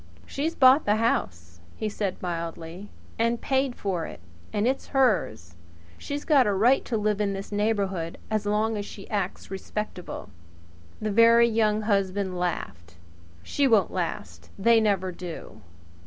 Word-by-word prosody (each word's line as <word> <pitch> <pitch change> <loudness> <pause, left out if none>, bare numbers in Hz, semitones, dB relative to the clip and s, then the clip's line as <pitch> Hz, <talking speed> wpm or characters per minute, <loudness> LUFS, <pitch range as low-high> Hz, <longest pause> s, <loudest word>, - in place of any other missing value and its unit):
"She's 315 +4 -3
bought 265 +2 +6
the 210 - +3
house," 85 - -1 0.2
he 215 - -3
said 205 -3 -3
mildly, 170 +2 -5 0.3
"and 230 +1 +1
paid 265 -2 0
for 180 -5 -2
it. - - -10 0.3
And 210 +2 0
it's 265 +1 -1
hers. 190 - +1 0.5
She's 290 0 -5
got 280 -7 +5
a 205 - +2
right 240 +7 +4
to 230 - -1
live 210 -1 0
in 200 -1 0
this 195 +1 -6
neighbourhood 200 -5 -1
as 215 -1 0
long 215 +1 +1
as 205 - -4
she 195 - -10
acts 200 -3 -3
respectable." 190 - -6 0.7
The 215 0 -2
Very 230 +2 +6
Young 215 -2 +2
Husband 195 -2 0
laughed. 95 - -4 0.5
"She 280 - +1
won't 215 -7 +3
last! 90 - -4
They 230 +2 +4
never 195 -3 +1
do." 175 -10 -9
205 Hz, 150 wpm, -26 LUFS, 180-230 Hz, 0.7 s, bought